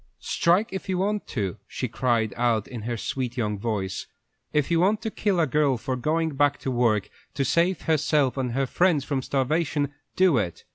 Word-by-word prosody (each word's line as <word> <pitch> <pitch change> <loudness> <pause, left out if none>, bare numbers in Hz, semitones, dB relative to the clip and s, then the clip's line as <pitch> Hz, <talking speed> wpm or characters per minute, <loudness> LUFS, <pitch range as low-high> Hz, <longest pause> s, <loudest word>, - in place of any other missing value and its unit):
"Strike 190 +7 +2
if 190 0 -5
you 185 - +1
want 205 +2 -1
to," 100 -6 -3
she 130 - -3
cried 110 -1 0
out, 115 -3 +1
in 120 -3 -7
her 120 +2 -3
sweet 125 +2 -3
young 105 -4 -1
voice. 100 -4 -3 0.4
"If 150 +1 +1
you 165 - +3
want 200 +5 +3
to 220 - -2
kill 200 -4 0
a 165 - +4
girl 145 -2 +2
for 130 +3 -3
going 160 +5 0
back 145 +1 +2
to 135 - -2
work 115 -5 +1 0.2
to 140 - 0
save 170 +6 +2
herself 150 -4 +2
and 130 -3 -2
her 135 +2 +1
friends 165 +1 +2
from 140 -2 -1
starvation, 145 +2 0 0.2
do 180 -9 +4
it. 90 -5 -4
135 Hz, 195 wpm, -25 LUFS, 120-165 Hz, 0.4 s, a